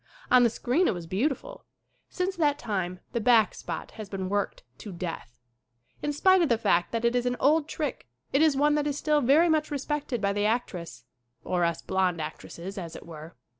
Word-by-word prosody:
On 255 - +7
the 240 - +5
screen 255 +10 +1
it - - +1
was 175 -1 -7
beautiful. 275 - -2 0.5
Since 370 +1 -2
that 295 -3 +2
time 185 -8 -3
the 235 - 0
"back 225 -3 +4
spot" - - -6
has 215 -3 -9
been 190 -2 -4
worked 205 0 -2 0.2
to 210 - -8
death. 170 -8 -6 0.7
In 295 - -1
spite 375 +6 +4
of 335 - +2
the 235 - +3
fact 175 -6 +1
that 230 0 -1
it 235 +1 +2
is 245 0 +1
an 245 - 0
old 300 +2 +3
trick 295 -5 -4 0.3
it 275 - +4
is 310 -4 +4
one 295 +1 +3
that 295 0 +1
is 290 -1 -2
still 300 -1 +2
very 290 +7 +5
much 310 -2 +1
respected 285 -3 -2
by 200 -1 0
the 205 +1 +1
actress 180 - -3 0.4
or 180 -1 0
us 170 -1 -1
blond 185 -3 0
actresses, 170 +5 -7
as 165 -3 -7
it - - -10
were. 160 0 -10
235 Hz, 205 wpm, -27 LUFS, 185-295 Hz, 0.7 s, On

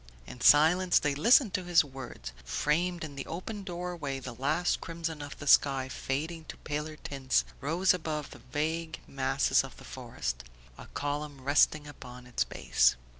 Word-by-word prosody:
In 125 - -11
silence 175 +5 +6
they 145 -1 +1
listened 225 - +5
to 185 - -1
his 175 -2 +4
words. 130 - -8
Framed 175 +3 0
in 150 -3 -7
the 135 - -6
open 200 +5 -5
door 180 -1 -4
way 140 -5 -4
the 130 -2 -7
last 150 +8 0
crimson 165 -2 -4
of 145 0 -8
the 145 - -8
sky, 135 -2 +4
fading 155 +6 -3
to - - -9
Paler 150 +1 -4
tints, 135 -3 0
rose 170 +7 +2
above 155 -4 -4
the - - -11
vague 160 +2 -2
masses 70 - +1
of - - -10
the - - -13
forest, - - -5 0.3
a - - -12
column 145 -1 -3
resting 145 +2 +3
upon 125 -4 -11
its 125 -2 0
base. - - +2
150 Hz, 170 wpm, -30 LUFS, 135-170 Hz, 0.3 s, silence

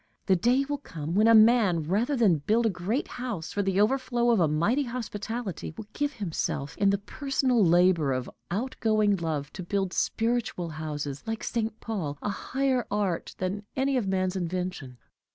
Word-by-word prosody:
The 190 - +4
day 245 +9 +2
will 290 -1 -2
come 165 - -6
when 210 +4 +4
a 230 - +7
man, 215 -7 +5
rather 210 - 0
than 205 - +3
build 220 +10 +1
a 225 - +3
great 190 - -2
house 235 -10 -5
for 205 - 0
the 195 -1 0
overflow 240 +1 +2
of 230 - +3
a 165 - +4
mighty 170 - +1
hospitality, 225 -6 -5
will 220 - -6
give 290 -1 -1
himself, 165 - -3
in 200 -1 +3
the 200 - +2
personal 255 +2 0
labor 175 -4 +4
of 130 -1 -2 0.2
outgoing 215 -1 +1
love, 155 -4 -3
to 190 - -6
build 190 +1 -1
spiritual 225 -7 -1
houses 150 -3 -5
like 225 0 -3
St. 225 -1 -2
Paul 175 -11 -3
a - - -1
higher 260 +3 -1
art 200 -5 -1
than 190 +3 -3
any 270 +1 +1
of 240 -6 0
man's 185 -1 0
invention. 180 -7 -4
205 Hz, 175 wpm, -27 LUFS, 175-235 Hz, 0.2 s, a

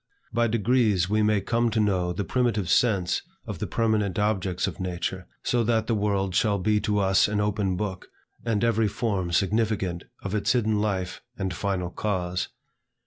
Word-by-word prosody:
By 120 +1 +2
degrees 110 -4 +2
we 110 0 +3
may 105 -1 +3
come 115 +4 +1
to 110 - 0
know 95 -4 +1
the 90 +4 -2
primitive 115 -6 0
sense 95 -8 +2 0.2
of - - -6
the - - -2
permanent 110 -4 0
objects 95 -3 0
of - - -5
nature, 95 0 -3 0.2
so 120 -1 +1
that 110 -1 +2
the 115 - 0
world 100 -3 0
shall 100 +2 +2
be 105 +2 +2
to 105 0 0
us 95 -1 +4
an 105 0 -1
open 105 -3 0
book, 95 -2 -4 0.4
and 115 -2 0
every 115 -2 +3
form 100 -4 -1
significant 100 -2 0 0.2
of 100 - -4
its 105 +3 +2
hidden 110 -4 +1
life 95 -4 -2 0.2
and 95 -2 -2
final 90 -1 -2
cause. 90 -4 -2
105 Hz, 175 wpm, -26 LUFS, 95-110 Hz, 0.4 s, us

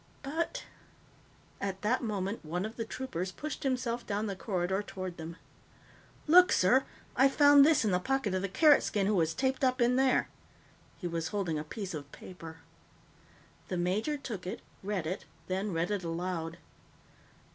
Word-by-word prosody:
But 330 - -2 0.5
" - - -30 0.3
At 195 0 -3
that 235 +5 +2
moment, 205 -3 -3
one 175 +5 -2
of 220 +1 -6
the 230 - -3
troopers 190 -8 -4
pushed 305 +9 -6
himself 250 -3 -1
down 205 +1 -2
the 200 -2 -3
corridor 190 -1 -1
toward 185 -3 -6
them. 165 +1 -7 0.9
"Look, 360 +4 +7
sir! 245 +9 +4 0.3
I 270 +2 +5
found 285 0 +7
this 300 -5 +4
in 210 - +2
the 180 - +2
pocket 265 -1 0
of 185 - 0
the 195 - -2
Carrot 295 - +6
skin 200 -2 0
who 210 - +2
was 165 -4 +1
taped 265 0 0
up 255 0 +2
in 245 +1 +3
there!" 265 -1 +3 0.7
He 180 - -8
was 165 -1 -2
holding 180 -7 -1
a - - -4
piece 190 +4 -6
of 145 -2 -7
paper. 165 -3 -10 1.1
The 180 - -2
major 200 +12 0
took 215 -10 -6
it, - - -5 0.2
read 195 -4 -2
it, 180 +4 -4 0.2
then 190 +2 -1
read 170 +2 -1
it 200 -3 -1
aloud. 165 -1 -3
200 Hz, 175 wpm, -31 LUFS, 180-255 Hz, 1.1 s, Look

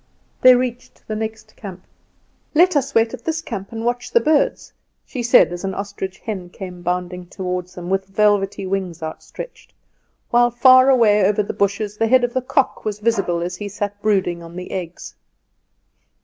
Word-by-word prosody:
They 255 0 +8
reached 245 0 -4
the 215 - -3
next 220 0 -6
camp. 190 -4 -9 0.7
"Let 350 +2 +5
us 280 0 0
wait 225 +1 +3
at 250 - -8
this 325 0 -1
camp 200 -11 -6
and 225 0 -5
watch 245 +1 -1
the 470 - +4
birds," 305 -7 +1 0.3
she 255 - -5
said, 240 -6 +5
as 175 - -6
an 190 -1 -3
ostrich 200 -1 -5
hen 190 -5 -6
came 180 -1 -9
bounding 180 0 -3
toward 180 -1 -4
them 180 -1 -9
with 190 +1 -1
velvety 200 -1 +1
wings 185 -3 -3
outstretched, 160 - -9 0.6
while 240 0 +5
far 255 +2 +6
away 215 -6 +5
over 210 +2 +2
the - - -5
bushes 200 +1 -1
the 225 - +1
head 255 +2 +4
of 240 0 0
the 255 - 0
cock 265 +2 0
was 210 -1 -3
visible 205 -6 0
as 175 +1 -4
he 205 +1 -5
sat 205 0 -5
brooding 190 -5 +1
on 170 0 -11
the 180 0 -7
eggs. 180 -2 -6
205 Hz, 180 wpm, -20 LUFS, 185-240 Hz, 0.7 s, They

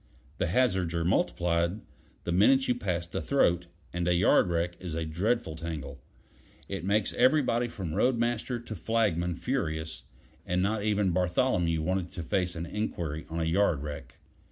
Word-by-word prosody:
The - - +1
hazards 95 -4 +1
are 85 0 0
multiplied 85 +2 +1 0.4
the - - -2
minute 130 +9 +4
you 125 - +3
pass 90 -8 -2
the 85 - -4
throat, 90 -11 +2 0.3
and 90 0 -1
a 90 - +3
yard 90 +1 +4
wreck 85 +1 0
is 90 -4 -5
a 80 0 -2
dreadful 95 +3 -1
tangle; 75 -4 -6 0.7
it - - -4
makes 100 +2 +1
everybody 125 -2 +3
from 95 -8 -5
road 125 +7 +2
master 120 +1 -1
to 115 -1 -7
flagman 90 -4 0
furious, 80 -10 -3 0.4
and 90 +1 -1
not 105 +3 +1
even 105 -3 +2
Bartholomew 90 -2 +1
wanted 90 0 -1
to 85 - -5
face 90 +1 -1
an 85 0 -4
inquiry 85 -6 -3
on 80 +1 -3
a - - +1
yard 85 -4 +2
wreck. 75 -1 -7
90 Hz, 165 wpm, -29 LUFS, 85-110 Hz, 0.7 s, minute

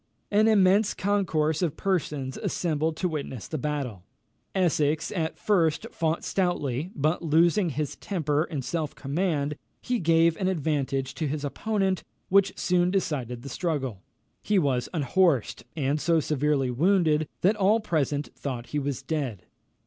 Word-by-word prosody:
An 210 +2 +4
immense 200 0 +4
concourse 170 -6 +1
of 170 -5 -1
persons 150 -8 -1
assembled 160 -2 -1
to 185 - 0
witness 140 - -5
the 155 - -4
battle. 135 -9 -3 0.5
Essex 155 -4 +1
at 160 -4 -2
first 165 -7 +1
fought 160 0 -1
stoutly, 165 -5 -1
but, 155 +3 +1
losing 170 +4 +3
his 150 0 -3
temper 155 -5 0
and 145 -8 -5
self 155 +1 -2
command, 150 0 -1 0.2
he 250 -1 -1
gave 165 -1 +4
an 185 - 0
advantage 140 -6 -1
to 155 - -2
his 145 +1 -3
opponent 195 +4 -1 0.3
which 195 0 +3
soon 180 -1 +2
decided 135 - -2
the 140 - -7
struggle. 135 - -2 0.4
He 210 - +1
was 135 -8 +1
unhorsed, 160 - +1
and 145 0 0
so 165 +1 +3
severely 145 -3 +1
wounded, 155 +1 +2
that 195 +5 +4
all 210 +2 +3
present 150 -7 -1
thought 125 -4 -5
he 150 - -1
was 140 -2 -3
dead. 135 - -3
155 Hz, 145 wpm, -27 LUFS, 140-185 Hz, 0.5 s, An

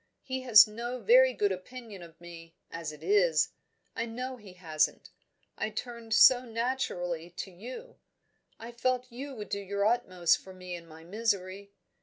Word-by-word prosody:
He 260 -1 -4
has 235 -4 +8
no 235 +3 -5
very 250 +4 +6
good 205 -5 0
opinion 210 +1 -8
of 165 -1 -14
me, 170 -1 -12 0.2
as 165 -2 -5
it 150 0 -13
is, 175 -4 +3 0.5
I 230 - -2
know 250 +3 -5
he 210 -6 -14
hasn't. 160 -4 -1 0.5
I 215 - -1
turned 230 0 -4
so 250 +1 +7
naturally 225 -9 -3
to 190 +2 -7
you; 255 - -10 0.6
I 230 +1 -8
felt 250 +1 -1
you 270 +3 -7
would 210 -4 -8
do 200 - -2
your 200 +1 -2
utmost 185 -7 +2
for 190 -1 -13
me 180 -1 -8
in 170 -1 -8
my 160 0 -13
misery. 200 0 -2
210 Hz, 165 wpm, -29 LUFS, 180-240 Hz, 0.6 s, has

